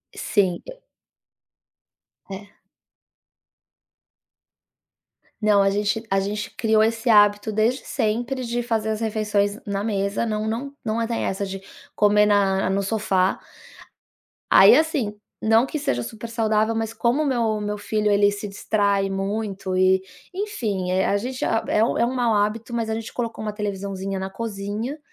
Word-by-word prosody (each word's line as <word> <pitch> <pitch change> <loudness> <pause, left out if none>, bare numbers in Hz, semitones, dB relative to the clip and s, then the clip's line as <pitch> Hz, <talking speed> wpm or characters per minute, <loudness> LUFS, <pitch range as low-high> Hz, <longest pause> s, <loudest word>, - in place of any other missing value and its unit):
Sim, 190 -5 0
e - - -10 1.5
É. 200 +1 -9 2.9
Não, 210 -1 +4
a 195 - +2
gente 210 +2 -1
a 195 - +3
gente 205 +2 -3
criou 220 -1 +2
esse 230 +2 0
hábito 205 0 +5
desde 225 +5 +1
sempre 240 +4 -2
de 240 +1 -1
fazer 225 -2 -1
as 215 +1 -2
refeições 210 -2 0
na 200 0 -2
mesa. 200 -1 -1
Não 215 -1 -2
não 245 +6 -3
não 225 +1 0
tem 230 0 -2
dessa 195 +1 -2
de 195 0 -6 0.4
comer 210 0 +4
na 195 -2 +2
no 195 +1 0
sofá 195 -3 0 1.1
aí - - +9
assim, 285 -10 +1 0.3
não 225 +3 +4
que 305 - -4
seja 120 - -1
super 220 - -8
saudável, 220 -1 +1
mas 225 0 -2
como 245 +7 +1
meu 230 -6 0
meu 210 0 -3
filho 210 0 0
ele 205 0 +4
se 205 0 -6
distrai 200 -1 0
muito 195 -1 -3
e 185 0 +4 0.3
enfim, 225 - -2
eh, 185 +1 +2
a 200 - +1
gente 255 +4 -4
é 225 -1 +1
um - - 0
é - - +3
um 250 - -2
mau 240 -3 +1
hábito, 215 +3 -1
mas 230 -1 -1
a - - -1
gente 225 0 -5
colocou 230 -3 -4
uma 210 - -3
televisãozinha 195 -2 -4
na 190 0 -4
cozinha, 215 +6 -5
210 Hz, 155 wpm, -23 LUFS, 200-230 Hz, 2.9 s, aí